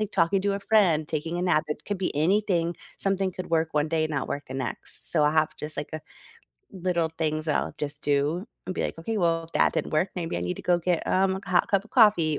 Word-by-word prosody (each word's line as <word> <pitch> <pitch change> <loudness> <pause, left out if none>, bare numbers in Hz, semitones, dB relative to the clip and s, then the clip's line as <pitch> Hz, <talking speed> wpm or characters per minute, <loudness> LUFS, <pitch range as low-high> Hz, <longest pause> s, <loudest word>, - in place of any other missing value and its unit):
Like 215 -1 -2
talking 190 +4 +2
to 200 0 +1
a 200 - -4
friend, 180 -9 +3
taking 160 +2 -2
a - - -1
nap, 165 -4 +2
it 150 0 -5
could 205 -2 -3
be 185 - -2
anything. 175 0 +1 0.2
Something 195 -1 0
could 185 -1 -7
work 160 -1 +1
one 150 +1 +1
day 160 -1 +1
and 155 - -3
not 145 - -2
work 145 - -4
the 130 - -8
next. 135 0 0
So, 150 - +4
I 150 - +3
have 155 0 +1
just 150 0 -3
like 145 - -4
a 155 - -4 0.7
little 175 -3 -1
things 155 0 -1
that 150 - +1
I'll - - -7
just 145 0 -3
do 145 +6 +1 0.2
and 185 - -3
be, - - -1
like, - - -3
"Okay, 220 +7 -3
well, 165 -3 +1
if 165 - -17
that - - +3
didn't - - -2
work, 155 +5 +1
maybe 165 - -3
I - - -2
need 90 +1 -3
to - - -8
go 175 -1 +2
get, 175 0 0
um, 190 0 +2
a 190 - -10
hot 180 +3 +3
cup 200 -2 +1
of - - -19
coffee 175 - +4
165 Hz, 265 wpm, -26 LUFS, 155-190 Hz, 0.7 s, So